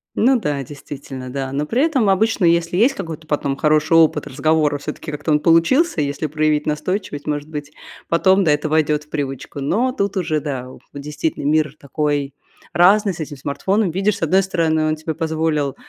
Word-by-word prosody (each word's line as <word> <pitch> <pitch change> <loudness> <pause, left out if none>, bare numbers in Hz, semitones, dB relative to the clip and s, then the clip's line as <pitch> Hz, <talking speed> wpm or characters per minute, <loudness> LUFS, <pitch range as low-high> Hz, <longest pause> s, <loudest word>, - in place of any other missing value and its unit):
Ну 255 +2 +3
да, 145 -8 -2
действительно, 135 -1 -9
да. 135 0 -4
Но 145 +2 -1
при 240 - +1
этом 270 -10 +2
обычно, 210 0 +2
если 170 +1 +2
есть 245 +7 +4
какой-то 165 -4 -7
потом 145 -2 -1
хороший 150 +2 +2
опыт 165 -1 +4
разговора, 155 +1 +1
всё-таки 150 +2 -6
как-то 150 +1 -3
он 150 - +4
получился, 165 - +3
если 145 +1 -2
проявить 155 0 0
настойчивость, 150 0 -3
может 145 0 -2
быть, 150 -1 -6 0.4
потом, 190 +3 +3
да, 160 - +3
это 150 +1 0
войдёт 150 -1 +1
в 150 - -26
привычку. 140 -2 -5
Но 215 - +1
тут 200 -6 -2
уже, 160 -4 0
да, 135 -4 -4
о - - -13
действительно, 150 +1 -4
мир 150 0 +1
такой 145 -1 -2 0.4
разный 195 +4 +4
с 170 - -11
этим 150 -2 -6
смартфоном. 185 +9 -1
Видишь, 195 +3 0
с - - -14
одной 185 +5 +3
стороны, 160 -4 0
он 155 - +1
тебе 155 +1 -4
позволил, 160 -3 -1
155 Hz, 185 wpm, -20 LUFS, 145-180 Hz, 0.4 s, есть